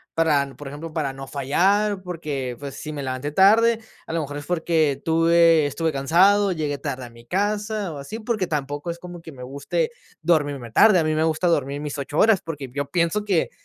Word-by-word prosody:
para, 145 Hz, -5 st, +1 dB
por 145 Hz, -, -8 dB
ejemplo, 150 Hz, +4 st, -7 dB
para 145 Hz, -5 st, -2 dB
no 135 Hz, 0 st, -8 dB
fallar, 190 Hz, +9 st, +1 dB
porque, 145 Hz, -8 st, -4 dB
pues, 140 Hz, -1 st, -7 dB
si 155 Hz, -, -6 dB
me 145 Hz, -2 st, -5 dB
levanté 130 Hz, +2 st, -3 dB
tarde, 220 Hz, +6 st, +5 dB, 0.3 s
a -, -, -7 dB
lo 165 Hz, -, 0 dB
mejor 145 Hz, 0 st, -5 dB
es 145 Hz, -, -7 dB
porque 160 Hz, -5 st, +1 dB
tuve 165 Hz, -1 st, +4 dB
estuve 160 Hz, +3 st, -1 dB
cansado, 190 Hz, +8 st, +4 dB
llegué 150 Hz, -4 st, -2 dB
tarde 130 Hz, -4 st, -4 dB
a -, -, -10 dB
mi 115 Hz, 0 st, -16 dB
casa 205 Hz, -, -1 dB
o -, -, -7 dB
así, 180 Hz, +11 st, -7 dB
porque 215 Hz, -4 st, -1 dB
tampoco 145 Hz, +1 st, -3 dB
es 170 Hz, -, -7 dB
como 175 Hz, -1 st, -9 dB
que 160 Hz, -, -10 dB
me 125 Hz, -2 st, -10 dB
guste 140 Hz, -, -2 dB, 0.3 s
dormirme 145 Hz, -7 st, 0 dB
tarde. 210 Hz, -, +6 dB
A -, -, +2 dB
mí 155 Hz, 0 st, 0 dB
me 155 Hz, +1 st, +1 dB
gusta 160 Hz, +2 st, 0 dB
dormir 145 Hz, -4 st, 0 dB
mis 150 Hz, 0 st, -5 dB
8 145 Hz, +2 st, -4 dB
horas, 215 Hz, -4 st, +5 dB
porque 145 Hz, -5 st, -6 dB
yo 140 Hz, 0 st, -3 dB
pienso 175 Hz, +4 st, +1 dB
que 190 Hz, -6 st, 0 dB
160 Hz, 210 wpm, -23 LUFS, 140-180 Hz, 0.3 s, tarde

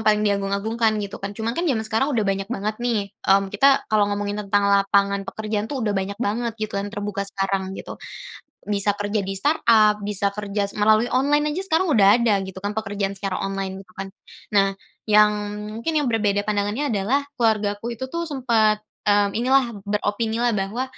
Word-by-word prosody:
paling 210 Hz, 0 st, +3 dB
diagung-agungkan 210 Hz, +3 st, 0 dB
gitu 200 Hz, -, -8 dB
kan 200 Hz, +1 st, -6 dB
cuma 225 Hz, +1 st, -2 dB
kan 335 Hz, -, -2 dB
jaman 220 Hz, -5 st, 0 dB
sekarang 225 Hz, +6 st, 0 dB
udah 230 Hz, -7 st, 0 dB
banyak 195 Hz, 0 st, -1 dB
banget 215 Hz, -2 st, -2 dB
nih, 215 Hz, -5 st, -1 dB, 0.2 s
mmm, 195 Hz, 0 st, +3 dB
kita 275 Hz, +6 st, +4 dB
kalau 205 Hz, -1 st, +4 dB
ngomongin 205 Hz, 0 st, -2 dB
lapangan 200 Hz, 0 st, +3 dB
pekerjaan 215 Hz, 0 st, -3 dB
tuh 265 Hz, -5 st, -3 dB
udah 210 Hz, -, +1 dB
banyak 195 Hz, +1 st, -2 dB
banget 230 Hz, +1 st, -1 dB
gitu 215 Hz, -2 st, -3 dB
dan 205 Hz, -, -4 dB
terbuka 205 Hz, -1 st, -4 dB
sekarang 195 Hz, -1 st, -2 dB
gitu, -, -, -7 dB, 0.8 s
bisa 205 Hz, 0 st, +2 dB
kerja 205 Hz, +1 st, -2 dB
di 195 Hz, -, -3 dB
startup 215 Hz, -1 st, +4 dB
bisa 200 Hz, -1 st, 0 dB
kerja 205 Hz, -1 st, -2 dB
melalui 215 Hz, +3 st, +4 dB
online 295 Hz, +4 st, +1 dB
aja 380 Hz, -, -2 dB
sekarang 360 Hz, +1 st, +1 dB
udah 220 Hz, -4 st, +5 dB
ada 220 Hz, -4 st, +3 dB
gitu 190 Hz, 0 st, -8 dB
kan 205 Hz, +2 st, -4 dB
pekerjaan 200 Hz, -2 st, -2 dB
secara 195 Hz, -1 st, -3 dB
online 195 Hz, -1 st, -3 dB
gitu 185 Hz, -1 st, -17 dB
kan, 195 Hz, 0 st, -6 dB, 0.4 s
nah 195 Hz, -1 st, +3 dB, 0.3 s
yang 210 Hz, 0 st, +6 dB, 0.5 s
mungkin 325 Hz, +6 st, -1 dB
yang 295 Hz, -, +2 dB
berbeda 210 Hz, -4 st, +1 dB
pandangannya 210 Hz, +6 st, -1 dB
adalah 235 Hz, +8 st, +1 dB, 0.2 s
keluargaku 220 Hz, +1 st, 0 dB
itu 260 Hz, -, -5 dB
tuh 335 Hz, 0 st, -3 dB
sempat, 225 Hz, -6 st, +1 dB, 0.2 s
mmm, 205 Hz, -1 st, +3 dB
ini 235 Hz, +5 st, -1 dB
lah 270 Hz, -1 st, +5 dB, 0.2 s
beropini 210 Hz, +2 st, -1 dB
lah 240 Hz, 0 st, +1 dB
bahwa, 205 Hz, +6 st, -2 dB
210 Hz, 180 wpm, -23 LUFS, 200-230 Hz, 0.8 s, yang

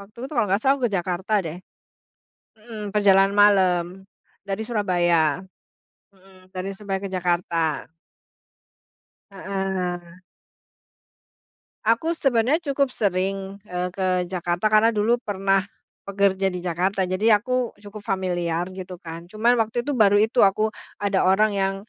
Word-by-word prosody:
Waktu 200 Hz, +3 st, -16 dB
itu, -, -, -3 dB
kalau 230 Hz, -7 st, +1 dB
nggak 195 Hz, +3 st, +1 dB
salah, 270 Hz, +1 st, +5 dB
aku 250 Hz, -, -1 dB
ke -, -, -13 dB
Jakarta, 180 Hz, +4 st, -3 dB
deh. 165 Hz, +1 st, -5 dB, 1.0 s
Mhm, 215 Hz, -2 st, -8 dB
perjalanan 195 Hz, -1 st, +4 dB
malam. 190 Hz, -4 st, +4 dB, 0.6 s
Dari 200 Hz, +2 st, -3 dB
Surabaya. 175 Hz, -, +1 dB, 0.7 s
Mhm, 185 Hz, -1 st, -22 dB
dari 185 Hz, +1 st, -4 dB
Surabaya 195 Hz, -1 st, -4 dB
ke 195 Hz, -, -4 dB
Jakarta. 175 Hz, -4 st, -1 dB, 1.4 s
Heeh. 185 Hz, -3 st, -4 dB, 1.6 s
Aku 230 Hz, +10 st, +2 dB
sebenarnya 270 Hz, 0 st, +1 dB
cukup 280 Hz, -4 st, -1 dB
sering, 195 Hz, 0 st, -2 dB
eee, 180 Hz, -2 st, -3 dB
ke 180 Hz, -1 st, -1 dB
Jakarta. 175 Hz, +2 st, -1 dB
Karena 215 Hz, +2 st, +4 dB
dulu 220 Hz, +3 st, +2 dB
pernah 195 Hz, -4 st, 0 dB, 0.4 s
pekerja 195 Hz, -1 st, +1 dB
di 180 Hz, -, -4 dB
Jakarta, 185 Hz, +2 st, -1 dB
jadi 210 Hz, +3 st, +3 dB
aku 250 Hz, 0 st, -1 dB
cukup 205 Hz, 0 st, -10 dB
familiar, 175 Hz, -3 st, -1 dB
gitu 185 Hz, -1 st, -8 dB
kan. 165 Hz, 0 st, -8 dB
Cuman 230 Hz, +4 st, +2 dB
waktu 225 Hz, +1 st, 0 dB
itu, 290 Hz, -2 st, -2 dB
baru 205 Hz, -2 st, +5 dB
itu 225 Hz, +2 st, +4 dB
aku 200 Hz, +2 st, +2 dB, 0.3 s
ada 200 Hz, -1 st, +1 dB
orang 205 Hz, +3 st, +3 dB
yang 195 Hz, 0 st, 0 dB
195 Hz, 130 wpm, -23 LUFS, 180-215 Hz, 1.6 s, salah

